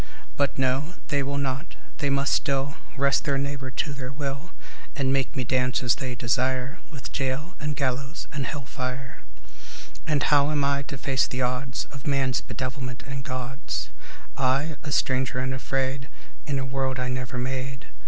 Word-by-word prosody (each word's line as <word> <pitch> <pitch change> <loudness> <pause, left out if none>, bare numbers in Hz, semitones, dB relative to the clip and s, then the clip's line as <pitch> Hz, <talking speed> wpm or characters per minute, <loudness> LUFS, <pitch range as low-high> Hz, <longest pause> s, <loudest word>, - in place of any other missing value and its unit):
But 140 -1 +2
no, 135 +6 +2
they 145 -1 +3
will 140 +1 -1
not; 140 +4 -1 0.2
they 145 - +2
must 140 +1 +3
still 140 -1 +2 0.2
Wrest 140 0 +4
their 140 -2 +3
neighbour 140 -1 -1
to 145 +3 -1
their 130 -2 -4
will, 140 +3 -3 0.5
And 135 -3 +2
make 135 -1 +1
me 130 - +1
dance 130 +2 +2
as 120 -1 +5
they 130 -2 -2
desire 130 +5 +1
With 140 -5 -7
jail 135 +6 -1
and 150 -1 -1
gallows 135 +2 -1
and 140 -2 -1
hell 145 -1 -3
fire. 130 +1 -4 0.9
And 150 -3 +3
how 145 -1 +5
am 150 -2 +2
I 140 0 +3
to 140 0 -5
face 135 -1 +3
the 125 0 0
odds 125 +1 0
Of 135 -1 -8
man's 135 -2 +3
bedevilment 130 +1 -4
and 135 0 -4
God's? 130 +3 -3 0.4
I, 135 +4 +2
a 145 - -4
stranger 130 -1 +2
and 130 +1 +1
afraid 135 +1 0 0.4
In 140 -2 +1
a 135 - 0
world 130 0 0
I 125 - 0
never 130 0 -2
made. 130 +1 -2
135 Hz, 175 wpm, -27 LUFS, 130-140 Hz, 0.9 s, as